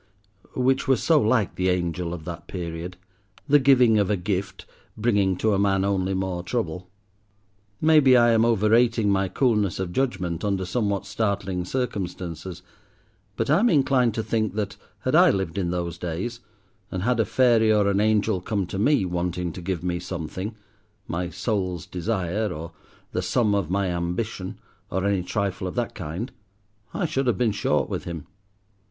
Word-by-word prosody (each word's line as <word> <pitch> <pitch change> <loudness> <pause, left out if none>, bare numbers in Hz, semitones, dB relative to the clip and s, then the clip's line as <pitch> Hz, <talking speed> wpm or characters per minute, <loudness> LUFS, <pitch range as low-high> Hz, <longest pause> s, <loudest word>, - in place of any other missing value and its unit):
Which 130 +2 +1
was 130 -3 +2
so 160 -3 +4
like 110 -1 +2
the 95 0 0
angel 85 -1 -1
of 85 -3 -7
that 85 -2 -7
period, 85 0 -5 0.5
the 145 0 +6
giving 125 -5 +5
of 100 - +1
a 105 - +2
gift, 95 +1 -3 0.3
bringing 100 -5 +2
to 110 +1 +1
a 95 - +1
man 95 -1 +2
only 95 -1 0
more 95 -2 -2
trouble. 90 -3 -3 0.9
Maybe 150 -5 +6
I 120 -1 +5
am 115 0 +4
overrating 115 0 +3
my 95 0 +2
coolness 105 -3 +1
of 95 -2 -3
judgment 95 -10 -1
under 100 -2 0
somewhat 100 0 -1
startling 100 -3 -2
circumstances, 90 - -4 0.7
but - - -1
I 155 - +5
am 240 +4 +4
inclined 130 - +3
to 110 - -1
think 110 -2 -1
that, 105 -2 -2 0.3
had - - -1
I - - +7
lived 95 -1 -1
in 90 -3 -1
those 85 -1 -3
days, 90 +8 -4 0.5
and 90 0 -3
had 125 +1 +1
a - - +5
fairy 115 -1 +4
or 105 -2 +3
an 100 0 +2
angel 105 -2 +2
come 100 0 -1
to 95 +2 -5
me, 140 -2 +3
wanting 90 0 -2
to 90 - -8
give 90 -1 -3
me 90 -1 -1
something—my 95 +1 -6
soul's 90 -2 -2
desire, 95 +2 -2
or 85 0 -6 0.4
the - - -1
sum 110 -4 +1
of 100 -6 0
my 95 0 0
ambition, 90 +2 -3 0.3
or 95 +1 -1
any 100 -2 +1
trifle 95 0 -2
of 90 - -6
that - - -2
kind 90 - -5 0.6
I 195 - -1
should 135 -4 -1
have 120 - +2
been 120 -3 +2
short 105 - 0
with - - -4
him. 85 -4 -6
100 Hz, 170 wpm, -24 LUFS, 90-110 Hz, 0.9 s, I